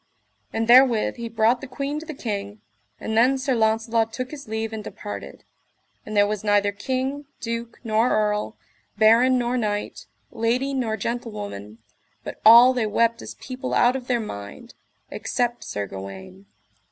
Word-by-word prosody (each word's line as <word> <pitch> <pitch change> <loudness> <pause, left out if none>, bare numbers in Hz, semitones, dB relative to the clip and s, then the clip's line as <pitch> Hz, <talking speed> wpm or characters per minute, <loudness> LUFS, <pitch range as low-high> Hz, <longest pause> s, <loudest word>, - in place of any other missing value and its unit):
And 225 0 -2
therewith 245 -2 +5
he 235 -1 -5
brought 230 +2 +2
the 270 - -7
queen 280 +3 -4
to 315 - -11
the 310 - -6
king, 205 -4 -5 0.4
and 220 - -4
then 250 +4 +4
Sir 265 0 -1
Launcelot 225 0 +1
took 255 +2 -5
his 290 -5 -9
leave 220 0 -3
and 215 -1 -5
departed; 205 0 -8 0.6
and 215 0 -3
there 205 - +6
was 210 0 -3
neither 205 -1 +2
king, 260 +7 -3
duke, 230 0 -5
nor 225 +1 +2
earl, 210 0 0 0.4
baron 230 +4 +5
nor 245 0 0
knight, 210 -3 -3 0.2
lady 245 +5 0
nor 230 -5 -1
gentlewoman, 205 - -5 0.5
but - - -8
all 235 +4 +9
they 240 -4 0
wept 230 +2 +1
as - - -8
people 255 0 -5
out 245 +2 +4
of 255 -2 -5
their 245 -2 +1
mind, 100 - -8 0.4
except 240 -1 -2
Sir 100 0 -4
Gawaine. 95 0 -10
230 Hz, 160 wpm, -23 LUFS, 210-250 Hz, 0.6 s, all